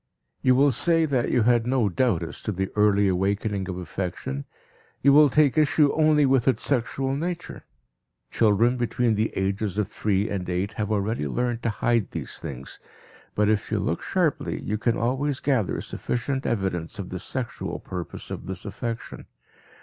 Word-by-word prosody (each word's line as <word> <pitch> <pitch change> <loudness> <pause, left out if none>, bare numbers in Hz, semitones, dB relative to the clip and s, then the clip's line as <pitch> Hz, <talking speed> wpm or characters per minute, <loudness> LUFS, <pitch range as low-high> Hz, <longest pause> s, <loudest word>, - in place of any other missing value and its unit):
You 130 -1 +4
will 140 +2 +5
say 165 +6 +2
that 130 -5 0
you 120 - +3
had 120 0 +3
no 125 -4 +2
doubt 100 -2 +1
as 80 - -7
to 105 - -2
the 95 0 -3
early 105 -1 +4
awakening 95 +1 0
of 90 - -4
affection, 85 -6 -4 0.6
you 140 +1 +6
will 150 0 +7
take 150 +2 +3
issue 150 -1 +3
only 155 -2 +4
with 130 -2 +2
its 130 - +2
sexual 135 +1 0
nature. 175 +3 -5 0.7
Children 115 +3 +3
between 120 -1 +1
the 110 +1 0
ages 100 +1 -1
of 105 -2 0
three 105 -1 0
and 95 -3 -3
eight 95 +4 -1
have 105 +1 -3
already 105 -5 0
learned 120 - -1
to 115 - 0
hide 115 0 +1
these - - -5
things, 65 0 -7 0.6
but 105 0 +2
if 105 -1 0
you - - +1
look - - -1
sharply - - 0
you 105 0 -3
can 115 0 +1
always 130 +4 0
gather 130 -9 0
sufficient 135 +2 -3
evidence 95 -6 -2
of 100 -3 -6
the 90 - -5
"sexual" 125 +5 -3
purpose 90 -2 -7
of - - -6
this 95 0 -5
affection. 115 +3 -5
110 Hz, 175 wpm, -25 LUFS, 95-130 Hz, 0.7 s, will